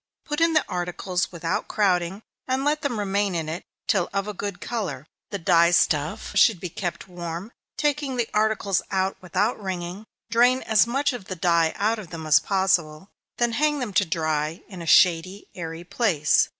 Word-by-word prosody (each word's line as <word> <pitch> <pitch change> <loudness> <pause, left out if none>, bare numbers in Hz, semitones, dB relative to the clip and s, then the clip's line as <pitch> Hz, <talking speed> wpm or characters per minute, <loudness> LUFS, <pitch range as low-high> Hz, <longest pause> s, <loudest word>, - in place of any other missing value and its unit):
Put 295 +1 -2
in 330 0 +4
the 310 - +3
articles 180 +1 -2
without 170 0 -2
crowding, 190 -1 0 0.2
and 260 +1 0
let 300 +1 +1
them 280 -6 -2
remain 200 -1 0
in 160 -2 -2
it 160 +3 -4 0.2
till 190 -4 +1
of 200 0 -2
a 210 - -4
good 200 -1 -5
color 180 - -4 0.2
the 200 - -3
dye 170 -1 +4
stuff 170 +2 +1
should 215 -6 +5
be 180 - -5
kept 175 +1 -5
warm 175 +3 -6 0.3
take 295 -1 +1
the 255 -5 -2
articles 210 -3 +1
out 190 0 0
without 205 +6 -1
wringing, 185 +1 -5 0.3
drain 245 +3 +4
as 220 0 +4
much 275 +3 0
of 240 -6 -7
the 185 - -5
dye 170 -2 +2
out 220 +2 0
of 190 -6 -9
them 160 -1 -7
as 155 -2 +6
possible, 190 -3 0 0.3
then 240 -1 +2
hang 295 +5 +1
them 245 -7 -4
to 200 - +4
dry 155 -1 -2
in 185 -4 -9
a 165 - -7
shady, 180 +3 +4
airy 165 -1 -6
place. 175 -6 +2
190 Hz, 185 wpm, -24 LUFS, 170-220 Hz, 0.3 s, as